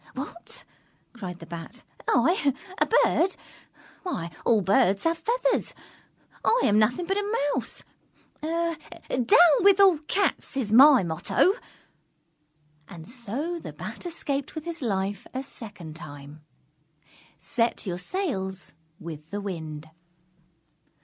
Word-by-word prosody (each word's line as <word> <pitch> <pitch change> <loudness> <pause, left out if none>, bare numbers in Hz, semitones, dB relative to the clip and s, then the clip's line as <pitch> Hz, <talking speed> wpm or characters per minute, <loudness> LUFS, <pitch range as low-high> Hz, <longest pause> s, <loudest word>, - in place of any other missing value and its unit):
"What," 310 +6 -7 0.5
cried 185 -7 -7
the 165 - -11
Bat, 170 +8 -8 0.2
"I, 280 +1 +3 0.2
a - - +3
Bird! 380 -5 +3 0.7
Why, 170 - -4
all 225 -3 +4
Birds 195 +1 +3
have 330 0 +1
feathers! - - 0 0.7
I 485 - +4
am 210 0 +4
nothing 245 +11 +2
but 390 +3 0
a 410 +2 -1 0.2
Mouse. - - -4 0.6
'Down 325 -6 -3 0.4
with 400 0 +6
all 380 -6 +6
Cats,' 390 -7 0
is 220 -6 -1
my 270 -1 +8
motto!" 175 - +2 1.3
And 165 -1 -10
so 260 - -3
the - - -8
Bat - - -7
escaped 285 -4 -3
with 315 0 -5
his 340 -2 -5
life 200 -4 -2
a 260 - -2
second 200 - -10
time. 145 -2 -10 1.0
_Set 230 -1 -1
your 180 -2 -3
sails 190 - -3 0.3
with 155 -2 -8
the 205 - -3
wind. 160 -6 -6
235 Hz, 120 wpm, -26 LUFS, -, 1.3 s, my